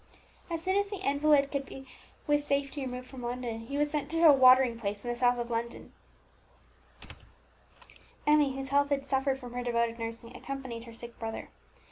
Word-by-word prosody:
As 330 Hz, -1 st, -3 dB
soon 375 Hz, +2 st, +1 dB
as 405 Hz, 0 st, +1 dB
the 405 Hz, -, -5 dB
invalid 285 Hz, 0 st, +3 dB
could 280 Hz, -1 st, -1 dB
be 270 Hz, 0 st, -11 dB, 0.4 s
with 295 Hz, 0 st, +2 dB
safety 280 Hz, 0 st, -1 dB
removed 250 Hz, -1 st, -5 dB
from 255 Hz, 0 st, -10 dB
London, 240 Hz, -1 st, -4 dB
he 280 Hz, -, -3 dB
was 295 Hz, 0 st, +1 dB
sent 300 Hz, -2 st, -2 dB
to 330 Hz, +1 st, 0 dB
a 295 Hz, -, +9 dB
watering 255 Hz, -3 st, +6 dB
place 205 Hz, -2 st, -4 dB
in 240 Hz, -, -2 dB
the -, -, -3 dB
south 245 Hz, 0 st, +2 dB
of 240 Hz, 0 st, -4 dB
England. 235 Hz, +1 st, -4 dB, 2.3 s
Emmie, 295 Hz, -3 st, +4 dB
whose 270 Hz, 0 st, -3 dB
health 285 Hz, +1 st, +2 dB
had 275 Hz, -1 st, 0 dB
suffered 270 Hz, 0 st, 0 dB
from 245 Hz, -2 st, -10 dB
her 245 Hz, -, -3 dB
devoted 235 Hz, -1 st, 0 dB
nursing, 230 Hz, +1 st, -6 dB
accompanied 260 Hz, -4 st, -6 dB
her 230 Hz, -, -11 dB
sick 235 Hz, 0 st, -9 dB
brother. 225 Hz, -1 st, -5 dB
265 Hz, 185 wpm, -30 LUFS, 240-285 Hz, 2.3 s, a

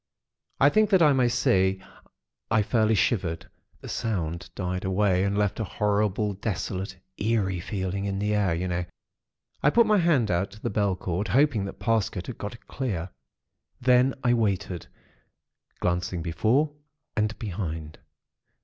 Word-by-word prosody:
I 140 Hz, -, +7 dB
think 215 Hz, +6 st, +3 dB
that 190 Hz, -3 st, +5 dB
I 150 Hz, -2 st, +6 dB
may 130 Hz, -2 st, +3 dB
say, 95 Hz, -6 st, +2 dB, 0.7 s
I 110 Hz, -2 st, +3 dB
fairly 110 Hz, 0 st, +2 dB
shivered. 95 Hz, -5 st, 0 dB, 0.3 s
The -, -, -9 dB
sound 85 Hz, -6 st, -3 dB
died 90 Hz, -1 st, -3 dB
away, 95 Hz, -1 st, +2 dB
and 100 Hz, +1 st, 0 dB
left 105 Hz, 0 st, 0 dB
a -, -, 0 dB
horrible, 105 Hz, 0 st, 0 dB
desolate, 95 Hz, -1 st, -4 dB, 0.2 s
eerie 100 Hz, -4 st, 0 dB
feeling, 95 Hz, +1 st, -3 dB
in 100 Hz, -1 st, -2 dB
the 105 Hz, +1 st, 0 dB
air, 100 Hz, -5 st, +2 dB
you 90 Hz, +3 st, -2 dB
know. 90 Hz, 0 st, -1 dB, 0.8 s
I 150 Hz, -, +5 dB
put 235 Hz, +9 st, +5 dB
my 215 Hz, -2 st, +4 dB
hand 150 Hz, -, +3 dB
out 90 Hz, +3 st, 0 dB
to 105 Hz, -, -13 dB
the -, -, -3 dB
bell 100 Hz, -2 st, +1 dB
cord, 90 Hz, +2 st, -3 dB
hoping 130 Hz, -7 st, +3 dB
that 100 Hz, -, -7 dB
Parsket 110 Hz, -6 st, 0 dB
had 125 Hz, -, -7 dB
got 105 Hz, +4 st, -5 dB
it -, -, -19 dB
clear. 95 Hz, -10 st, -3 dB, 0.7 s
Then 125 Hz, +1 st, +4 dB
I 120 Hz, -1 st, +4 dB
waited, 100 Hz, -6 st, -1 dB, 0.9 s
glancing 90 Hz, -1 st, -1 dB
before 115 Hz, -, +1 dB, 0.4 s
and 105 Hz, +1 st, 0 dB
behind. 80 Hz, -7 st, -5 dB
100 Hz, 155 wpm, -26 LUFS, 90-115 Hz, 0.9 s, I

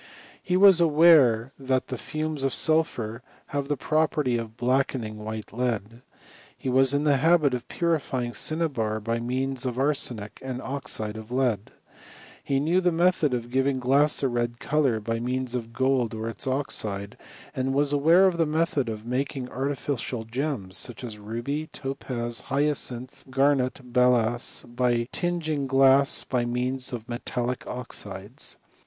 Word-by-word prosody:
He 180 Hz, 0 st, 0 dB
was 190 Hz, -2 st, +7 dB
aware 150 Hz, -7 st, +5 dB
that 130 Hz, 0 st, -1 dB
the 130 Hz, -, -3 dB
fumes 155 Hz, -2 st, -3 dB
of 135 Hz, -, +1 dB
sulphur 130 Hz, -8 st, +1 dB, 0.3 s
have 140 Hz, -1 st, -2 dB
the 145 Hz, -, -1 dB
property 155 Hz, -5 st, +1 dB
of 115 Hz, -1 st, -5 dB
blackening 125 Hz, -3 st, 0 dB
white 110 Hz, 0 st, -6 dB
lead. 115 Hz, -1 st, -2 dB, 0.6 s
He 130 Hz, -, -4 dB
was 135 Hz, +2 st, +4 dB
in 145 Hz, -, +1 dB
the 145 Hz, -2 st, +3 dB
nabit 155 Hz, -1 st, +3 dB
of 125 Hz, -1 st, -4 dB
purifying 135 Hz, -8 st, -1 dB
cinnabar 135 Hz, -11 st, -1 dB
by 115 Hz, +2 st, -2 dB
means 130 Hz, +2 st, -2 dB
of 125 Hz, -2 st, -3 dB
arsenic 130 Hz, -7 st, 0 dB
and 130 Hz, -1 st, -5 dB
oxide 110 Hz, -6 st, -3 dB
of 110 Hz, 0 st, -9 dB
lead. 120 Hz, -5 st, 0 dB, 0.7 s
He 135 Hz, -1 st, 0 dB
knew 165 Hz, +6 st, +2 dB
the 180 Hz, -1 st, +2 dB
method 165 Hz, -5 st, +2 dB
of 120 Hz, 0 st, -5 dB
giving 135 Hz, +1 st, +1 dB
glass 140 Hz, +4 st, +3 dB
ft 135 Hz, -3 st, 0 dB
red 120 Hz, 0 st, -1 dB
colour 140 Hz, -6 st, +1 dB
by 115 Hz, +2 st, -2 dB
means 125 Hz, +1 st, -2 dB
of 115 Hz, -2 st, -4 dB
gold 130 Hz, -3 st, +1 dB
or 110 Hz, +1 st, -4 dB
its 115 Hz, +3 st, -4 dB
oxide, 105 Hz, -7 st, -1 dB, 0.4 s
and 130 Hz, +1 st, -1 dB
wilt 145 Hz, +1 st, +1 dB
aware 165 Hz, +6 st, +5 dB
of 185 Hz, -3 st, +2 dB
the 165 Hz, -2 st, +2 dB
method 150 Hz, -5 st, 0 dB
of 110 Hz, 0 st, -6 dB
making 130 Hz, +1 st, -2 dB
artificial 135 Hz, -3 st, -3 dB
gems, 120 Hz, -6 st, -3 dB
soctr> 120 Hz, 0 st, -3 dB
as 110 Hz, -4 st, -7 dB
ruby, 120 Hz, +9 st, -4 dB
topaz, 125 Hz, -5 st, -4 dB
hyacinth, 135 Hz, -3 st, -1 dB
garnet, 135 Hz, -1 st, +2 dB, 0.2 s
balass, 120 Hz, -1 st, +2 dB
by 120 Hz, -1 st, +1 dB
tingini^ 160 Hz, -5 st, -1 dB
glass 135 Hz, +1 st, +4 dB
by 125 Hz, -2 st, -1 dB
means 125 Hz, +2 st, -2 dB
of 120 Hz, -2 st, -6 dB
metallic 120 Hz, +1 st, -3 dB
oxides. 105 Hz, -3 st, -6 dB
130 Hz, 150 wpm, -26 LUFS, 120-145 Hz, 0.7 s, was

